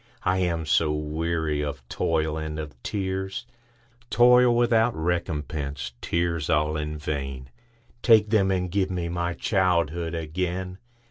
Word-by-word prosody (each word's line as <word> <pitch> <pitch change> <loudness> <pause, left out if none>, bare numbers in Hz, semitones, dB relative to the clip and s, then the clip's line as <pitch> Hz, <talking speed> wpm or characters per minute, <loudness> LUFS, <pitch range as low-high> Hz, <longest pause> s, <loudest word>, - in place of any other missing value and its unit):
I 90 +1 +2
am 85 -3 0
so 75 0 +2
weary 75 0 -1
of 70 -3 -5
toil 80 +1 0
and 80 -1 -4
of 75 -1 -6
tears,—Toil 120 - +1
without 120 -1 +3
recompense, 75 -5 -3
tears 85 -2 -1
all 75 +1 +2
in 75 0 -3
vain,—Take 105 - -1
them, 100 -4 +3
and 90 -2 0
give 95 0 +1
me 90 -2 -2
my 85 0 -2
childhood 85 -4 +1
again! 90 +3 -3
85 Hz, 120 wpm, -25 LUFS, 75-100 Hz, -, without